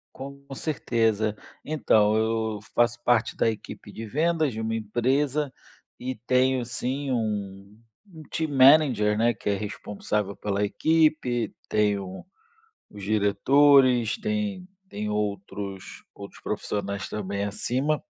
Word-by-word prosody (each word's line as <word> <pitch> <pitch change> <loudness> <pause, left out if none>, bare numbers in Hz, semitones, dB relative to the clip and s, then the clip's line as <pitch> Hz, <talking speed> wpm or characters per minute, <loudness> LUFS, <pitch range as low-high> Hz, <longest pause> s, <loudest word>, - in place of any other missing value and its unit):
Com 140 +1 -9
certeza. 115 -8 0 0.3
Então, 110 -8 +3
eu 110 -1 0
faço 120 0 +2
parte 120 -2 +2
da - - +2
equipe 105 -1 -6
de 115 0 -7
vendas 155 +2 +1
de 110 - -5
uma 110 0 -2
empresa 130 +6 0 0.5
e 130 +1 -4
tenho 130 0 +2
sim 130 +4 -3
um 105 -3 -3 0.3
um 160 -1 -11
team 160 -1 -2
manager, 130 -6 +5
né, 120 +2 +3
que 105 - -6
é 100 - +2
responsável 105 0 -3
pela 100 +1 -1
equipe, 155 -2 +1
tenho 100 - 0 0.7
os 100 -1 -10
diretores, 125 +4 +4
tem 210 -4 -2 0.2
tem 105 +1 -4
outros 100 -2 -4
outros 100 0 -11
profissionais 100 -1 -3
também 100 -1 -3
acima. 130 - -1
115 Hz, 120 wpm, -26 LUFS, 105-135 Hz, 0.7 s, manager